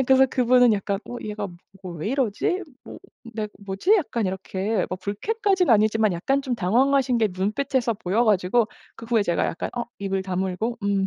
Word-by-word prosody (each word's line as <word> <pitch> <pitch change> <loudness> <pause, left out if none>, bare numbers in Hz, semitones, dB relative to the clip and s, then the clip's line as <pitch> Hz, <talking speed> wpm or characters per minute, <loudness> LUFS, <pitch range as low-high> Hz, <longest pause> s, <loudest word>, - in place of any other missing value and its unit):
네. - - +4
그래서 265 +1 +5
그분은 250 -2 +4
약간 200 -1 -1
'어 245 - -5
얘가 210 -1 -4 0.4
뭐 185 -2 -6
왜 160 - -3
이러지?' 270 - 0 0.2
뭐 - - -10 0.4
네. 215 -1 -3 0.2
'뭐지?' 200 - +2
약간 235 - -1
이렇게 190 +2 -2
불쾌까지는 380 - +1
아니지만 215 -1 +3
약간 270 +11 0
좀 260 -3 -2
당황하신 250 +5 +2
게 220 -2 +2
눈빛에서 230 +6 0
보여 205 +4 0
가지고 210 +2 +2 0.3
그 230 - -11
후에 225 -2 +2
제가 170 -3 0
약간 165 - -3
어 240 - -1
입을 195 -1 -2
다물고 190 +5 -2
음 200 -1 +1
220 Hz, 360 characters per minute, -24 LUFS, 195-255 Hz, 0.4 s, 그래서